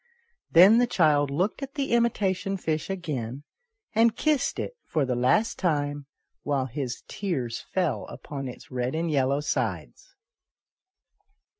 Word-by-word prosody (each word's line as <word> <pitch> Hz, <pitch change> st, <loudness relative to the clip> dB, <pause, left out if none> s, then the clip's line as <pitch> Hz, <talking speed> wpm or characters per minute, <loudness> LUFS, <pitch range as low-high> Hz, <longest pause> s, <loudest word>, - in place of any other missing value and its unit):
Then 195 Hz, +7 st, +8 dB
the 245 Hz, -, +3 dB
child 150 Hz, -, +3 dB
looked 180 Hz, -, -1 dB
at 275 Hz, 0 st, -6 dB
the 280 Hz, -2 st, -2 dB
imitation 200 Hz, -5 st, +1 dB
fish 160 Hz, -2 st, -2 dB
again, 145 Hz, -9 st, -4 dB, 0.5 s
and 225 Hz, +1 st, +4 dB
kissed 305 Hz, -4 st, +1 dB
it -, -, -4 dB
for 150 Hz, -4 st, 0 dB
the 130 Hz, -, -1 dB
last 130 Hz, -, +2 dB
time, 145 Hz, -5 st, -1 dB, 0.3 s
while 140 Hz, -2 st, 0 dB
his 130 Hz, -1 st, -5 dB
tears 135 Hz, -, -3 dB
fell 180 Hz, -5 st, 0 dB
upon 135 Hz, -2 st, -7 dB
its 120 Hz, -1 st, -10 dB
red 125 Hz, +2 st, -2 dB
and 165 Hz, 0 st, -1 dB
yellow 140 Hz, 0 st, +2 dB
sides. 150 Hz, -, -3 dB
155 Hz, 135 wpm, -26 LUFS, 135-200 Hz, 0.5 s, Then